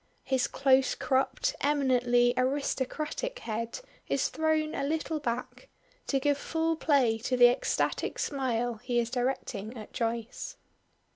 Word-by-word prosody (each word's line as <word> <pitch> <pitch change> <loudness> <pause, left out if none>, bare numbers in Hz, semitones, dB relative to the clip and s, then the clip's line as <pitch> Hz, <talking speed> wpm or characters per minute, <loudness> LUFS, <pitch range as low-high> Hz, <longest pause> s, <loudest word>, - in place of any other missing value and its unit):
His 260 -2 +1
close 265 -1 +3
cropped 270 - 0
eminently 250 -4 +3
aristocratic 285 - -1
head 230 - -4 0.3
is - - +1
thrown 315 -1 0
a - - -2
little 310 +2 -1
back, 250 - -4 0.4
to 275 - +1
give 285 +1 +1
full 325 +1 0
play 270 -8 +2
to 250 +2 -1
the 245 0 +8
ecstatic 245 - -1
smile 245 -4 -1
he 245 +2 -2
is 235 0 -1
directing 245 -3 -2
at 215 - -10
Joyce. 235 - -3
260 Hz, 130 wpm, -29 LUFS, 240-295 Hz, 0.4 s, the